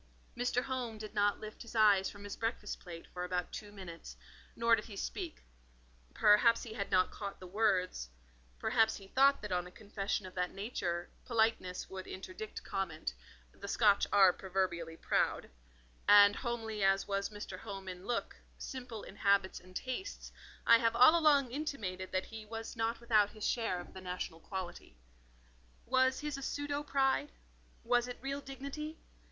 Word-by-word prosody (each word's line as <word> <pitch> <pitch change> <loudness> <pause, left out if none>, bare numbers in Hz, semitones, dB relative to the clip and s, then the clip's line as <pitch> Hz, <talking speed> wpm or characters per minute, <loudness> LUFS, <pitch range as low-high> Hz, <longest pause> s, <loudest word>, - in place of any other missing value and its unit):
Mr. 245 0 0
Home 250 -4 -3
did 215 0 -8
not 205 -1 +2
lift 215 0 -9
his 235 -1 -10
eyes 205 -3 +5
from 200 0 -11
his 205 - -6
breakfast 225 -2 -3
plate 170 -2 -9
for 180 - -4
about 180 0 -2
two 205 -1 -7
minutes, 170 - -9 0.4
nor 230 0 +5
did 215 - -5
he 210 - -9
speak; 340 - -5 0.7
perhaps 215 +2 +5
he 225 - -7
had 200 -2 -3
not 185 - +3
caught 200 -1 -6
the 185 - -9
words—perhaps 60 - 0
he 195 - -11
thought 275 0 +4
that 210 - -5
on 180 0 0
a - - -12
confession 200 -1 -3
of 185 - -9
that 180 -1 -1
nature, 180 -5 -2 0.2
politeness 220 -6 0
would 190 -1 -7
interdict 190 +3 -7
comment: 175 - -3 0.4
the - - -9
Scotch 205 -1 +4
are 195 -3 +7
proverbially 175 -4 -2
proud; - - 0 0.6
and 205 0 +8
homely 225 -4 -3
as 195 0 +3
was 200 0 -1
Mr. 205 -3 -7
Home 195 -3 -7
in 180 +1 -7
look, 240 -1 -2 0.2
simple 245 -4 -6
in 195 - -11
habits 200 -2 +2
and 185 0 -17
tastes, 260 - -5 0.3
I 230 0 +8
have 230 0 +2
all 255 +7 +8
along 290 -6 +4
intimated 215 -11 -4
that 185 0 0
he 220 -1 -8
was 225 +2 -6
not 225 0 -1
without 220 -3 +3
his 215 -1 -4
share 225 -7 0
of 175 - -10
the 190 - -9
national 180 -3 -5
quality. 185 - -7 0.9
Was 260 +2 +3
his 300 -2 -3
a - - -8
pseudo 290 +1 -2
pride? 275 0 +1 0.5
was 245 +1 +2
it 245 - -6
real 275 +1 -3
dignity? 280 +4 -6
210 Hz, 170 wpm, -34 LUFS, 185-240 Hz, 0.9 s, and